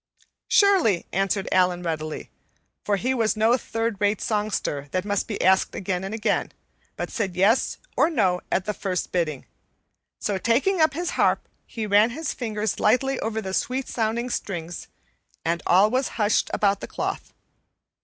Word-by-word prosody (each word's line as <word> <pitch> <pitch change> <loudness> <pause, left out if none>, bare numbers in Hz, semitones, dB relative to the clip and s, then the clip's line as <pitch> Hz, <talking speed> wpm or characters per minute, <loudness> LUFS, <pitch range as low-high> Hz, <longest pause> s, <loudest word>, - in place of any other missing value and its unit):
"Surely," 400 - +4
answered 195 +1 0
Allan 180 -1 +2
readily; 155 -2 -4 0.5
for 205 - +1
he 250 +6 0
was 225 -3 +1
no 225 +3 +4
third 225 -4 -3
rate 205 0 +2
songster 205 -9 -2
that 185 +5 -2
must 205 -1 -1
be 210 - -4
asked 190 +1 +3
again 185 -1 -2
and 195 - -4
again, 220 0 0 0.4
but - - -4
said 195 -6 -2
"yes" 200 +7 +2 0.2
or - - +4
"no" 190 - +1
at 190 - +1
the 210 - -1
first 190 -3 -3
bidding; 155 -6 -1 0.7
so, 200 -2 -1
taking 280 - +2
up 315 -2 +3
his 345 +1 -2
harp, - - +1 0.2
he 225 -2 -4
ran 210 +2 +4
his 315 +7 -4
fingers 215 -4 -3
lightly 260 +5 +2
over 220 0 -2
the 190 0 -5
sweetly 255 +6 -1
sounding 235 +2 -1
strings, 175 -6 -4 0.6
and 170 +1 0
all 195 +4 +5
was 260 +1 +1
hushed 210 -1 +2
about 200 -2 +2
the - - -7
cloth. - - -4
210 Hz, 165 wpm, -24 LUFS, 190-235 Hz, 0.7 s, all